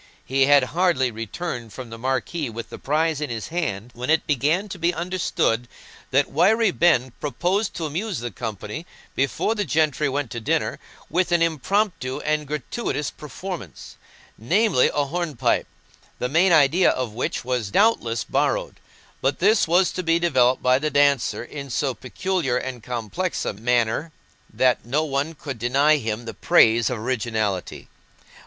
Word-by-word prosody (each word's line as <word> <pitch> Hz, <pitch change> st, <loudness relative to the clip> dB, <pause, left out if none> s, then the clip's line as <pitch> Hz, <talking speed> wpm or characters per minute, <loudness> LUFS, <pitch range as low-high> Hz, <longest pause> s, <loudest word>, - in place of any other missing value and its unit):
He 135 Hz, +1 st, +2 dB
had 145 Hz, -1 st, +6 dB
hardly 165 Hz, -8 st, +2 dB
returned 115 Hz, -, -5 dB
from 125 Hz, -3 st, -8 dB
the 115 Hz, -, -7 dB
marquee 130 Hz, +4 st, -2 dB
with 115 Hz, +1 st, -7 dB
the -, -, -8 dB
prize 155 Hz, +1 st, 0 dB
in 150 Hz, -, -2 dB
his 115 Hz, -2 st, -5 dB
hand, 120 Hz, -, -3 dB
when 125 Hz, +3 st, -5 dB
it 160 Hz, 0 st, +3 dB
began 155 Hz, -, +1 dB
to 185 Hz, -, -7 dB
be 170 Hz, +1 st, +1 dB
understood 170 Hz, -9 st, 0 dB, 0.4 s
that 135 Hz, +2 st, +2 dB
Wiry 205 Hz, +8 st, +3 dB
Ben 130 Hz, -8 st, +3 dB
proposed 180 Hz, +8 st, -1 dB
to 165 Hz, -, -3 dB
amuse 180 Hz, +7 st, -3 dB
the 120 Hz, 0 st, -4 dB
company, 110 Hz, -, -6 dB, 0.3 s
before 135 Hz, +10 st, 0 dB
the 210 Hz, -2 st, -1 dB
gentry 155 Hz, -4 st, +1 dB
went 135 Hz, -2 st, -2 dB
to 120 Hz, -, -4 dB
dinner, 110 Hz, -, -1 dB, 0.3 s
with 175 Hz, +2 st, 0 dB
an 170 Hz, -1 st, +4 dB
impromptu 165 Hz, -3 st, 0 dB
and 150 Hz, -1 st, -1 dB
gratuitous 150 Hz, -, -3 dB
performance—namely, 150 Hz, -, -2 dB
a 145 Hz, -1 st, 0 dB
hornpipe, 145 Hz, -6 st, -1 dB, 0.5 s
the 125 Hz, -, -2 dB
main 170 Hz, +6 st, +4 dB
idea 160 Hz, +3 st, +5 dB
of 125 Hz, -4 st, -2 dB
which 120 Hz, +1 st, -3 dB
was 125 Hz, -5 st, -1 dB
doubtless 120 Hz, -, +2 dB
borrowed; -, -, -1 dB, 0.4 s
but 135 Hz, +2 st, +1 dB
this 205 Hz, +2 st, +3 dB
was 180 Hz, +3 st, +3 dB
to 185 Hz, -, -3 dB
be 165 Hz, -1 st, +2 dB
developed 130 Hz, -7 st, +2 dB
by 125 Hz, +1 st, +4 dB
the 155 Hz, +2 st, -1 dB
dancer 140 Hz, -4 st, +2 dB
in 140 Hz, +2 st, -8 dB
so 135 Hz, +1 st, 0 dB
peculiar 135 Hz, -, -2 dB
and 125 Hz, -1 st, -5 dB
complex 125 Hz, -, -3 dB
a -, -, -1 dB
manner 120 Hz, +7 st, 0 dB, 0.4 s
that 130 Hz, -1 st, +2 dB
no 140 Hz, +7 st, 0 dB
one 145 Hz, +2 st, -2 dB
could 140 Hz, -5 st, -7 dB
deny 140 Hz, +6 st, +3 dB
him 115 Hz, -2 st, -4 dB
the 115 Hz, -, -6 dB
praise 115 Hz, 0 st, +4 dB
of 125 Hz, -, -2 dB
originality. 110 Hz, -5 st, -2 dB
140 Hz, 160 wpm, -23 LUFS, 120-170 Hz, 0.5 s, had